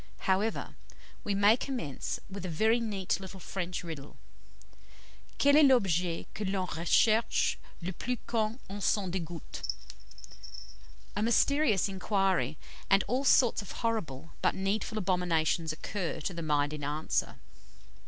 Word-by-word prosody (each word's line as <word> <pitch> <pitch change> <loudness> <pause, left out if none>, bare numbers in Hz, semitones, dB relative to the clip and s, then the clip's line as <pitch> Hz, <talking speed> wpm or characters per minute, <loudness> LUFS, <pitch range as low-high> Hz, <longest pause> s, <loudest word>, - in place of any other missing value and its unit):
However, 195 +4 0 0.5
we 205 - -1
may 205 +2 +6
commence 245 - -4
with 200 -1 -7
a 185 - -3
very 220 +8 +3
neat 205 -6 -1
little 190 0 -9
French 180 0 -4
riddle. 155 -4 -8 1.2
"Quel 285 0 +5
est 310 - +8
l'objet 180 - +2
que 215 - -4
l'on 190 -1 -1
recherche 215 +7 +3 0.3
le 185 +2 -3
plus 250 +8 -3
quand 225 +1 -1
on 205 +2 -6
s'en 195 -2 +1
dégoûte?" 170 -3 -6 1.5
A - - -1
mysterious 235 - +3
inquiry, 190 - 0 0.3
and 195 0 +5
all 255 +3 0
sorts 250 -5 +4
of 200 - -9
horrible 165 - -2
but - - +2
needful 200 +3 -1
abominations 175 -4 +1
occur 175 +3 -4
to 180 - -3
the 170 - -5
mind 145 -2 +1
in 150 -1 -6
answer. 150 +2 -1
190 Hz, 135 wpm, -30 LUFS, 165-220 Hz, 1.5 s, est